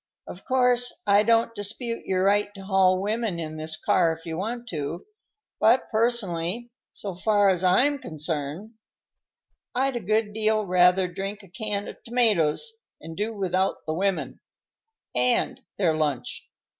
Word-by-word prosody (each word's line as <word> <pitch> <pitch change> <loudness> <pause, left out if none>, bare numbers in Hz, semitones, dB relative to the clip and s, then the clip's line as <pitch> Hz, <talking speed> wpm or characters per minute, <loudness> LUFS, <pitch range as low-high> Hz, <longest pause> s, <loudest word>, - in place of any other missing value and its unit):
"Of 180 - -10
course, 250 -1 +2
I 205 0 +5
don't 230 +1 +2
dispute 230 +3 -5
your 185 -1 +1
right 205 +1 +2
to 195 -1 -10
haul 190 -1 +3
women 215 -3 -1
in 155 -1 -5
this 155 0 -3
car 170 -3 +3
if 165 +1 -12
you 165 -1 -4
want 235 +7 -4
to; 155 +1 -4 0.5
but 235 +4 +3
personally, 225 -2 0 0.2
so 200 -2 -6
far 205 +2 +3
as 180 -1 -1
I'm 265 +11 +3
concerned, 155 - -4 1.0
I'd 265 +1 +1
a - - -1
good 215 +1 0
deal 215 0 +1
rather 180 0 +4
drink 195 +3 -5
a - - -14
can 205 0 -3
of - - -10
tomatoes 230 - +2 0.3
and 165 +1 -9
do 210 +4 -2
without 190 -2 -1
the 155 - -2
women 195 +3 -1 0.7
and 250 +1 +1 0.2
their 170 -5 +2
lunch. 150 -5 -3
200 Hz, 150 wpm, -25 LUFS, 175-225 Hz, 1.0 s, I